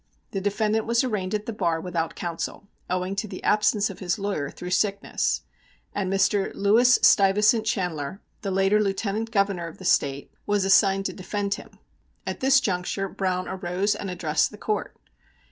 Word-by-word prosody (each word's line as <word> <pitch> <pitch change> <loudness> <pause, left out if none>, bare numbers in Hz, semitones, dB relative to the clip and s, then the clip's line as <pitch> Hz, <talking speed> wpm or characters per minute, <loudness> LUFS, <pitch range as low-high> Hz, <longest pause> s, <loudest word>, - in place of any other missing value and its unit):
The 195 - -3
defendant 215 +2 0
was 235 +1 +2
arraigned 210 -5 -1
at 210 0 -3
the 230 - -4
bar 170 -6 0
without 165 -1 -3
counsel, 175 +3 -5 0.2
owing 185 +2 -1
to 215 - -1
the - - -8
absence 210 0 +2
of 195 - -12
his 175 -2 -1
lawyer 195 -8 -2
through 180 +4 -8
sickness, 200 +1 0 0.5
and 190 -2 -2
Mr. 195 0 +2
Lewis 235 +5 +5
Stuyvesant 210 +3 +5
Chanler, 180 - -2 0.2
the 200 - -3
later 195 +2 +3
Lieutenant 205 +2 -1
Governor 200 -5 0
of 165 - -10
the 185 - -10
State, 140 -4 +1 0.2
was 205 -2 +1
assigned 195 0 +4
to - - -2
defend 200 +1 -2
him. - - -10 0.5
At - - -4
this 265 +1 +5
juncture 195 -2 -2
Browne 185 -1 -2
arose 190 +2 -1
and 205 -1 -5
addressed 160 -4 +1
the 210 - -12
Court. 210 0 -3
195 Hz, 170 wpm, -25 LUFS, 180-210 Hz, 0.5 s, Lewis